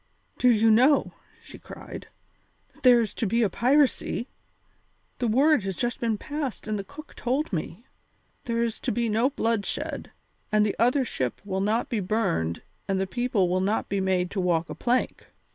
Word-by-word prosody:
"Do 250 - +5
you 225 -1 +4
know," 260 +6 +4 0.3
she - - -12
cried, - - -10 0.7
"that - - -23
there 245 -2 +6
is 220 - -3
to 225 - -2
be 230 +4 +2
a 200 - +1
piracy? 260 -1 +1 0.9
The 245 - 0
word 275 +5 +4
has 195 -1 -4
just 240 +5 -2
been 225 -2 0
passed 290 -3 -5
and 215 -1 -1
the - - -4
cook 285 +7 -12
told 260 +1 -2
me. 175 +7 -4 0.6
There 235 -1 0
is 230 -2 -2
to - - -2
be 235 +1 0
no 225 +5 +2
bloodshed, 230 -6 -2 0.4
and 215 0 +4
the 205 - -1
other 250 +4 +3
ship 130 - -3
will 190 -1 -2
not 215 +4 0
be 230 - -1
burned 85 - -1 0.2
and 195 -1 0
the 190 - 0
people 235 -2 0
will 185 +1 0
not 205 +3 -1
be 200 -1 0
made 185 -1 0
to 195 - -1
walk 170 -2 0
a - - -3
plank. 250 +1 -1
225 Hz, 185 wpm, -26 LUFS, 195-245 Hz, 0.9 s, there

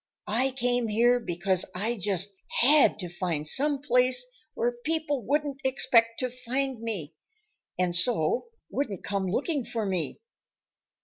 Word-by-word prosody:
I 255 +4 +2
came 245 -2 0
here 240 +3 +3
because 185 -3 0
I 220 +6 -1
just 200 -1 -2 0.3
HAD 290 +4 +5
to 180 - -4
find 170 -3 -3
some 285 - +1
place 250 -1 +3 0.3
where 240 +1 -1
people 310 -5 -1
wouldn't 285 +2 -1
expect 240 -3 +3
to 255 -1 -1
find 255 0 -3
me 195 -9 -4 0.6
and 180 -1 0
so 195 - +2 0.2
wouldn't 215 -10 -3
come 195 -1 -2
looking 275 - -1
for 225 -2 -3
me. 185 -5 -2
235 Hz, 135 wpm, -27 LUFS, 190-265 Hz, 0.6 s, HAD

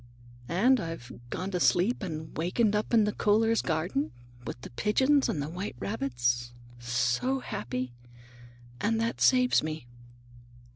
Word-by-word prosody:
And 240 +10 +4
I've 165 - -6 0.2
gone 190 +8 -3
to 180 - -1
sleep 195 +7 +3
and 160 -5 -5
wakened 205 +6 +1
up 210 - -1
in 225 -2 +5
the 210 0 0
Kohlers' 225 +2 +3
garden, 160 -2 -1 0.4
with - - -5
the - - -9
pigeons 260 - +2
and 145 - -1
the - - -4
white 180 +2 -5
rabbits, 120 +2 -1 0.3
so 120 - 0
happy! 125 - -4 0.9
And 225 +6 +1
that 230 +1 -1
saves 255 -1 +5
me." 155 -3 -5
175 Hz, 140 wpm, -29 LUFS, -, 0.9 s, in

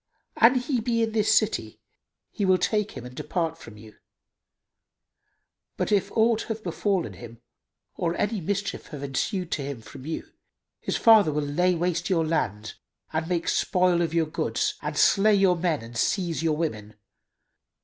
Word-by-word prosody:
An 240 +3 +6
he 255 0 0
be 230 0 +1
in 225 - -1
this 215 -1 +2
city, 160 - +1 0.5
he - - -3
will 185 -1 +4
take 210 +3 0
him 125 - -8
and 125 - -9
depart 165 0 -2
from 115 -8 -12
you; 110 0 -14 1.8
but, - - -1
if 200 -1 +1
aught 225 0 +3
have 225 -1 -4
befallen 185 +1 -1
him 115 -1 -11 0.6
or 170 0 -1
any 205 +1 -1
mischief 200 +4 -3
have 145 -4 -8
ensued 175 +6 -2
to 150 - -1
him 140 -3 -5
from 130 +5 -11
you, 160 - -4 0.5
his - - -2
father 220 -8 +6
will 150 0 -1
lay 175 +6 +1
waste 175 +1 -1
your 165 -4 +2
land 105 -10 -2 0.4
and 160 +1 -2
make 170 -2 -1
spoil 180 -1 +2
of 165 -2 0
your 165 -1 +2
goods 155 - -1
and - - -4
slay 210 +1 +5
your 195 -2 +4
men 165 -6 -1
and 115 0 -9
seize 175 -2 0
your 160 -2 +1
women. 110 -10 -4
175 Hz, 170 wpm, -26 LUFS, 150-205 Hz, 1.8 s, An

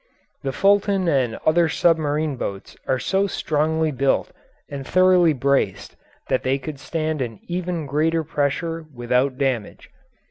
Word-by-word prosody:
The 135 - -2
Fulton 195 +2 +2
and 130 -7 +1
other 165 +1 +4
submarine 155 -2 +1
boats 100 -5 -6
are 130 - +2
so 195 +8 0
strongly 160 -2 0
built 135 0 0 0.4
and 140 -1 -6
thoroughly 180 +1 +4
braced 140 0 0 0.3
that 130 - +1
they 130 +1 +1
could 140 +1 -7
stand 155 -1 -2
an 115 -4 -4
even 175 -2 -3
greater 160 +4 +1
pressure 160 +3 -2
without 125 +2 0
damage. 130 -6 -2
150 Hz, 135 wpm, -22 LUFS, 135-165 Hz, 0.4 s, other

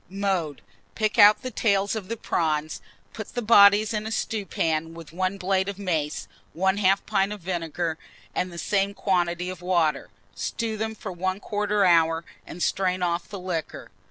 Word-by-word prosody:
Mode. 190 -6 -2 0.3
Pick 215 -1 0
out 210 +5 +7
the 255 - -4
tails 200 -2 +1
of 210 -4 -5
the 230 - -4
prawns, 155 -5 -1 0.3
put - - -8
the 245 - -1
bodies 210 0 +6
in 215 0 -2
a - - -5
stewpan 165 -8 -2
with 165 -2 -11
1 185 +2 -1
blade 190 +1 0
of 200 - -6
mace, 160 -7 -2 0.3
1/2 190 +1 +2
pint 195 -1 +1
of 210 -2 -6
vinegar, 165 -2 -3 0.3
and 180 - -2
the 170 - -9
same 200 +2 0
quantity 180 -2 0
of 180 -1 -10
water; 170 -5 +1 0.2
stew 220 - -3
them 220 +1 -3
for 205 -2 -7
1/4 200 +3 0
hour, 165 -1 +3 0.2
and 175 - -5
strain 185 -1 0
off 170 0 -1
the 200 - -6
liquor. 180 -3 -5
185 Hz, 165 wpm, -25 LUFS, 170-205 Hz, 0.3 s, out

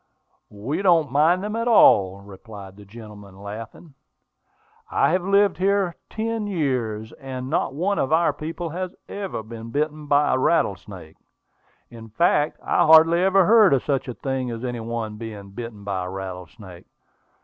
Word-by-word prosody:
"We 110 - -4
don't 165 -8 +3
mind 160 +7 +3
them 210 +1 -4
at 230 +1 -2
all," 100 - +5
replied 100 0 -12
the 105 0 -14
gentleman, 105 -2 -13
laughing. 110 - -9 1.0
"I - - +2
have 180 +2 +1
lived 200 +1 +2
here 195 -2 +1
ten 220 -1 -3
years, 125 - -2
and 130 0 -7
not 135 -4 -1
one 195 +6 -1
of 135 - -1
our 160 -1 +3
people 165 +3 -6
has 185 +2 -5
ever 195 - -5
been 115 +1 -9
bitten 150 +3 -3
by 145 +1 +3
a 130 - +1
rattlesnake. 95 - -1 0.7
In 115 -1 -12
fact, 150 +4 +1
I - - +2
hardly 160 +2 +6
ever 190 0 +4
heard 215 -7 +6
of 130 - -2
such 140 -2 -1
a 125 - -6
thing 130 -2 -3
as 115 0 -6
any 120 -1 -4
one 115 -2 -5
being 105 -3 -9
bitten 110 -1 -8
by 95 -2 -3
a - - -5
rattlesnake. 95 0 -9
130 Hz, 160 wpm, -23 LUFS, 105-170 Hz, 1.0 s, hardly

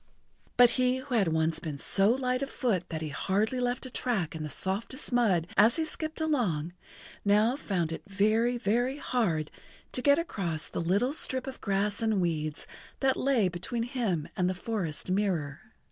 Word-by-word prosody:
But 245 -1 +7
he 250 0 +2
who 260 0 -6
had 210 -6 +3
once 160 0 +1
been 155 -4 -5
so 195 +7 +3
light 255 +1 +1
of 275 - -2
foot 215 -12 -1
that 160 -1 -4
he 155 - -3
hardly 205 - 0
left 245 +1 -1
a 260 - -6
track 215 -11 -1
in 160 - -6
the 155 - -4
softest 205 - -1
mud 200 -9 +3
as 220 +4 +5
he 320 - 0
skipped 315 0 -4
along, 205 - 0 0.5
now 210 +4 +3
found 180 - -2
it 160 - -5
very, 215 +5 +2
very 240 +4 0
hard 195 - -1 0.4
to 250 - -2
get 285 +2 +5
across 175 - -2
the - - -3
little 200 +11 +1
strip 260 -4 +1
of 265 -1 -8
grass 200 +2 0
and 220 -3 +1
weeds 155 -4 -2 0.3
that 265 -1 +2
lay 255 -7 +2
between 180 +7 -3
him 230 - -2
and 180 -1 +1
the 185 - -2
forest 180 -4 -3
mirror. 180 -8 0
210 Hz, 180 wpm, -29 LUFS, 175-250 Hz, 0.5 s, But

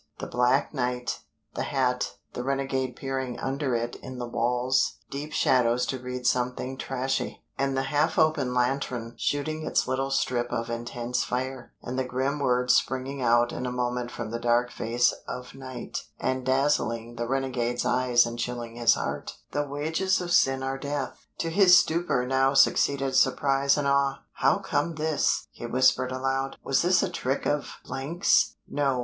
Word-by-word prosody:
The - - -5
black 125 +4 +1
night, 125 -2 -2 0.3
the - - -3
hat, 125 -2 0 0.2
the 125 - -4
renegade 135 -1 -1
peering 130 -2 -4
under 135 -1 -1
it 120 +1 -2
in 130 0 -9
the 120 -1 -4
wall's 125 +2 +1
deep 145 +3 -5
shadows 125 -3 +3
to 130 - -3
read 125 0 -6
something 125 +1 0
trashy, 135 0 -3
and 135 0 0
the 135 - +1
half 150 +4 +1
open 155 -5 +2
lantern 125 -2 -1
shooting 155 +2 -1
its - - +1
little 135 +1 -1
strip 120 -2 0
of 115 -1 -2
intense 120 +1 -2
fire, 130 0 -4
and 130 +2 -3
the - - +1
grim 130 +3 -1
words 125 -2 +2
springing 130 +1 0
out 120 0 +3
in 125 - -4
a - - -2
moment 125 0 -2
from 115 -2 -6
the 115 - -3
dark 120 +1 +2
face 120 +2 +1
of 125 0 -6
night 130 -2 -7
and 130 0 -1
dazzling 120 -4 +1
the 120 0 -2
renegade's 125 -2 -1
eyes 125 -2 +4
and 115 0 -5
chilling 120 -1 -4
his 120 -1 +5
heart: - - -4
"THE 145 0 -1
WAGES 160 +7 0
OF 175 -1 -4
SIN 135 -5 +3
ARE 135 0 -2
DEATH." 140 -2 -4
To 165 - -2
his 185 0 +7
stupor 160 -8 0
now 135 +1 +2
succeeded 135 0 +3
surprise 135 +2 +3
and 145 -1 0
awe. 140 0 +1
"How - - +3
comes 155 +2 -1
this?" 155 -1 +1
he 120 - -7
whispered 130 +1 +3
aloud, 135 +1 -1
"was 135 - +2
this 180 +1 +3
a 195 - 0
trick 135 -5 -2
of 145 -1 -1
's? 160 +8 +1
No! 135 -3 0
130 Hz, 170 wpm, -27 LUFS, 125-140 Hz, 0.3 s, his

